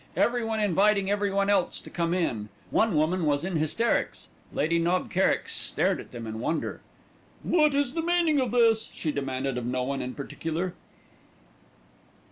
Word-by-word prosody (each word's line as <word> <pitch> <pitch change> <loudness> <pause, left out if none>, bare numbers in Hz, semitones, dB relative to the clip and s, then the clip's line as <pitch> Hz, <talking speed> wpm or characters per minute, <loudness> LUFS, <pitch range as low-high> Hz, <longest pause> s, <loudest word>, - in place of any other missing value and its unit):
Everyone 225 -2 +1
inviting 200 0 +3
everyone 200 -1 +1
else 200 -3 +1
to - - -11
come 170 -1 -1
in. 120 - -1 0.2
One 220 -5 +2
woman 165 +4 +1
was 145 -1 +1
in 185 -2 -1
hysterics. 155 +10 0 0.2
Lady 165 +3 +1
Knob 175 +2 0
Kerrick 190 +2 +2
stared - - 0
at - - -10
them 120 -2 -7
in 110 0 -5
wonder. 155 +7 -2 0.6
"What 305 -4 +3
is 280 -2 +1
the 330 - -1
meaning 335 -3 +2
of 255 -2 +1
this?" 230 -2 +3
she 155 - -3
demanded 135 -2 -2
of 120 - -6
no 125 0 -1
one 140 +2 -2
in 125 - -5
particular. 165 +5 -4
180 Hz, 160 wpm, -27 LUFS, 145-225 Hz, 0.6 s, inviting